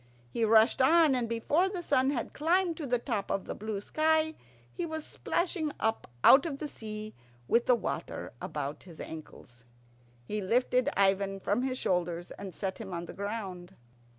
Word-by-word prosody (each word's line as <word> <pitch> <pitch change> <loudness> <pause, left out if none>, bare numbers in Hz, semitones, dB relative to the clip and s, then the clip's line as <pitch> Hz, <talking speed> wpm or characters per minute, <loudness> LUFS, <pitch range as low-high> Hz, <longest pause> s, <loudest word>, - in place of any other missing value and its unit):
He 230 - -1
rushed 220 +4 +5
on, 315 +2 +6
and 245 -3 0
before 290 +11 +2
the 365 -3 -5
sun 260 -4 +3
had 260 -5 -2
climbed 340 +3 +2
to 300 - -4
the 245 0 +2
top 230 -5 -3
of 195 - -1
the - - -4
blue 215 -1 -4
sky 315 +5 +2 0.4
he - - -3
was 315 -2 -4
splashing 340 -3 -1
up 220 0 -1
out 275 +5 +8
of 280 -4 -4
the 300 - -4
sea 215 -4 -7 0.3
with 235 +1 +3
the 250 - +6
water - - -4
about 145 0 -4
his 170 -4 -13
ankles. 125 -6 -10 0.6
He 210 +10 -3
lifted 250 +6 +2
Ivan 195 0 +2
from 205 +5 0
his 255 0 -1
shoulders 175 -4 -1
and 195 -2 -7
set 190 +2 -4
him 190 -5 -6
on 170 0 -4
the - - -9
ground. 200 -4 -5
230 Hz, 180 wpm, -30 LUFS, 195-295 Hz, 0.6 s, out